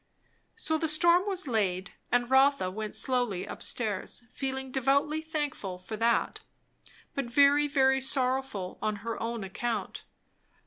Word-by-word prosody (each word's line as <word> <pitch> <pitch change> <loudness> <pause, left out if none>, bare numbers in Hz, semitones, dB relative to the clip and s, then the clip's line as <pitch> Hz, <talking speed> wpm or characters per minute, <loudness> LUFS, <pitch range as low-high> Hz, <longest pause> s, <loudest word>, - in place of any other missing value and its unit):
So 315 0 -1
the 320 - 0
storm 340 +5 +4
was 380 -5 -2
laid; 195 -6 0 0.2
and 245 0 +2
Rotha 265 -6 +4
went 215 +2 -4
slowly 245 -8 0
up - - -8
stairs, 215 0 -2
feeling 265 -1 -4
devoutly 280 +4 +1
thankful 295 - -4
for 185 +4 -7
that, 230 +2 +1 0.7
but 275 - -2
very, 285 +4 +4
very 265 -2 +3
sorrowful 260 -7 0
on 215 -1 0
her 230 -1 -3
own 230 -1 -3
account. 210 +1 -4
260 Hz, 135 wpm, -29 LUFS, 220-280 Hz, 0.7 s, storm